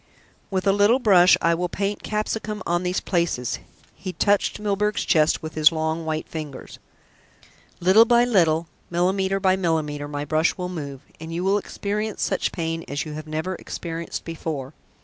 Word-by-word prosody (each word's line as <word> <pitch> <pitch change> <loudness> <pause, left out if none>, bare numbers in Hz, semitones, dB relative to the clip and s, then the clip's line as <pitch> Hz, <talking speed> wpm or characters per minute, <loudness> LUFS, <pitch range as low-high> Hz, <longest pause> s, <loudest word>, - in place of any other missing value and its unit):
"With 190 -1 -1
a 195 - +5
little 205 +5 +4
brush 190 -7 +6
I 170 - +4
will 175 +1 -1
paint 200 +3 -2
capsicum 215 0 -3
on 175 +1 +1
these 180 0 0
places." 170 -9 -1 0.3
He 185 -2 -7
touched 205 +5 +1
Milburgh's 210 0 0
chest 155 0 +3
with 160 0 -5
his 155 0 +5
long 160 0 -2
white 155 0 -2
ringers. 150 -4 -7 1.0
"Little 190 +6 +6
by 240 +1 +4
little, 170 -8 +3 0.2
millimetre 190 +3 +1
by 190 -1 +3
millimetre 155 -5 -1
my 145 0 -4
brush 155 +5 +1
will 180 -1 -3
move, 140 -6 -6 0.2
and 160 +1 -7
you 170 +2 -2
will 195 +2 +3
experience 210 +1 -3
such - - 0
pain 165 -1 -3
as 145 +2 -3
you 155 - -6
have 155 +1 -7
never 155 +4 -3
experienced 170 -2 -6
before. 155 -4 -5
175 Hz, 170 wpm, -23 LUFS, 160-195 Hz, 1.0 s, brush